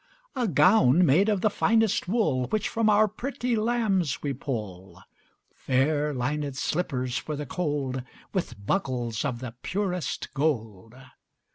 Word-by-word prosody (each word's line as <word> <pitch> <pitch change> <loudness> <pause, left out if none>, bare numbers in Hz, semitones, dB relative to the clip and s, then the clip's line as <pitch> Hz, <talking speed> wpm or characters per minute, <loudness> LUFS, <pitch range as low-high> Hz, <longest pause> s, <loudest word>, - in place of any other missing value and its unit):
A 250 -3 0
gown 175 - +5
made 175 +9 +4
of 205 -3 +1
the 215 - +3
finest 220 -2 +2
wool 175 - +1
Which 215 -1 -1
from 225 -1 +1
our 215 +1 +5
pretty 245 +3 -3
lambs 215 - 0
we 140 -2 -1
pull; 95 - -6 0.5
Fair 145 +3 +1
linèd 140 +2 -2
slippers 130 -5 -1
for 155 - -5
the 150 0 -5
cold, 145 -5 -2
15 130 - -6 0.3
With 170 - -4
buckles 125 - -1
of 125 -4 -3
the 125 -3 -6
purest 180 -4 -3
gold. 115 -7 -2
150 Hz, 140 wpm, -26 LUFS, 125-205 Hz, 0.5 s, gown